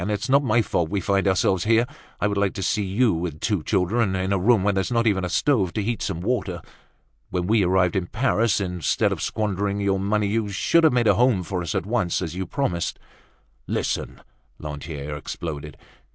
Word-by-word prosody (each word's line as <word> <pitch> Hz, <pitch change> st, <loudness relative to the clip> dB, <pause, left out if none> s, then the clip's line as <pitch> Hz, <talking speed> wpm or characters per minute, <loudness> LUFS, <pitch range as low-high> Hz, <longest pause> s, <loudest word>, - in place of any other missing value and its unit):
It's 105 Hz, +4 st, -2 dB
not 140 Hz, +2 st, +4 dB
my 115 Hz, -2 st, +2 dB
fault 85 Hz, -5 st, -1 dB
we 100 Hz, -, -1 dB
find 100 Hz, +1 st, +1 dB
ourselves 95 Hz, -1 st, +2 dB
here. 115 Hz, +2 st, +4 dB, 0.3 s
I -, -, 0 dB
would 100 Hz, -, -1 dB
like 100 Hz, -1 st, 0 dB
to 95 Hz, -, -3 dB
see 105 Hz, -, +1 dB
you, 105 Hz, +4 st, +2 dB
with 80 Hz, -2 st, -4 dB
two 105 Hz, -2 st, 0 dB
children, 95 Hz, +3 st, +1 dB
in 95 Hz, +1 st, -1 dB
a -, -, +2 dB
room 105 Hz, +1 st, +3 dB
where 100 Hz, 0 st, +2 dB
there's 95 Hz, -2 st, -1 dB
not 115 Hz, -1 st, +2 dB
even 100 Hz, -4 st, +2 dB
a 90 Hz, -, -2 dB
stove 105 Hz, -10 st, +1 dB
to 105 Hz, -, -1 dB
heat 115 Hz, +2 st, -2 dB
some 85 Hz, -, -3 dB
water. 95 Hz, -4 st, -1 dB, 0.7 s
When 90 Hz, -1 st, -2 dB
we 105 Hz, +1 st, +3 dB
arrived 90 Hz, -1 st, +2 dB
in 90 Hz, -2 st, -1 dB
Paris, 115 Hz, -2 st, +1 dB
instead 90 Hz, -3 st, 0 dB
of -, -, -3 dB
squandering 100 Hz, -2 st, -1 dB
your 100 Hz, -1 st, +1 dB
money, 105 Hz, +2 st, 0 dB
you 105 Hz, +1 st, -1 dB
should 160 Hz, -, +3 dB
have 155 Hz, -, +5 dB
made 120 Hz, -2 st, +2 dB
a 105 Hz, -, +6 dB
home 120 Hz, -3 st, +2 dB
for 90 Hz, +1 st, -3 dB
us 85 Hz, -, -4 dB
at -, -, -1 dB
once, 105 Hz, -5 st, 0 dB
as 85 Hz, -4 st, -4 dB
you 95 Hz, -1 st, -4 dB
promised." 90 Hz, -10 st, -2 dB, 0.7 s
"Listen!" -, -, -2 dB, 0.4 s
Lantier 75 Hz, 0 st, -6 dB
exploded. 75 Hz, 0 st, -6 dB
100 Hz, 210 wpm, -23 LUFS, 90-110 Hz, 0.7 s, a